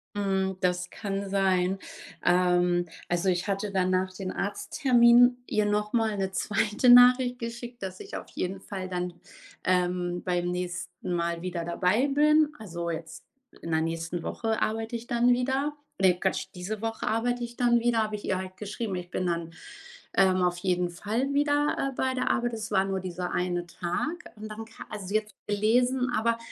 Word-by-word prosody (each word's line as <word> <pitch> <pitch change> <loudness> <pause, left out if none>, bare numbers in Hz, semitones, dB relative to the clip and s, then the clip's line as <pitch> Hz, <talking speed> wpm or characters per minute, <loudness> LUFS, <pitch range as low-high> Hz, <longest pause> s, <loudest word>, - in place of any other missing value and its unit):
Mhm, 190 -2 0
das 180 0 0
kann 200 -1 -4
sein. 190 -1 +2 0.4
Ähm, 175 0 +3 0.2
also, 175 +2 +1
ich 180 +2 0
hatte 200 +1 -1
dann 185 -1 +1
nach 185 0 0
dem 185 0 -5
Arzttermin 245 +3 +4
ihr 215 -1 +1
nochmal 210 +1 +1
'ne 190 -1 -1
2. 210 +4 +1
Nachricht 245 0 +7
geschickt, 235 0 -7
dass 185 -1 -5
ich - - -8
auf - - -7
jeden 190 +2 -3
Fall 190 -2 -5
dann, 180 -1 -3 0.5
ähm, 180 -1 0
beim 175 -1 0
nächsten 180 0 -4
Mal 170 -1 -1
wieder 175 -2 -3
dabei 185 +9 +2
bin. 300 +2 +4
Also, 170 -4 -4
jetzt 160 0 -7 0.4
in 165 - -5
der 160 0 +2
nächsten 165 +1 -3
Woche 225 +4 -2
arbeite 225 +2 -1
ich 235 +1 -6
dann 240 0 +3
wieder. 265 +4 +1 0.3
Ne! 190 -2 +5
Quatsch! 190 - -1
Diese 200 +4 -5
Woche 225 0 -3
arbeite 240 +2 0
ich 235 0 -6
dann 240 -1 +4
wieder, 230 -1 +2
habe 215 0 -3
ich 205 - -7
ihr 190 - 0
halt 185 0 -7
geschrieben: 210 -1 -4
„Ich 175 0 -6
bin 185 - -2
dann, 170 -1 -2 0.6
ähm, 185 -1 +4
auf 175 0 +1
jeden 180 -1 0
Fall 225 +10 -2
wieder, 290 -1 +2
äh, - - -13
bei 260 0 0
der 255 - 0
Arbeit.“ 240 -1 0
Das 220 -1 -4
war 190 -1 +3
nur 195 -1 -1
dieser 180 -1 -4
1 175 -1 -1
Tag 300 - -3
und 215 +1 -8
darum 220 +1 -7
ka 225 - -11
also, 205 -3 -6
sie 210 +2 +2
hat's 215 -1 -15
gelesen, 245 +5 +2
aber 230 +1 +1
195 Hz, 180 wpm, -28 LUFS, 180-235 Hz, 0.6 s, Nachricht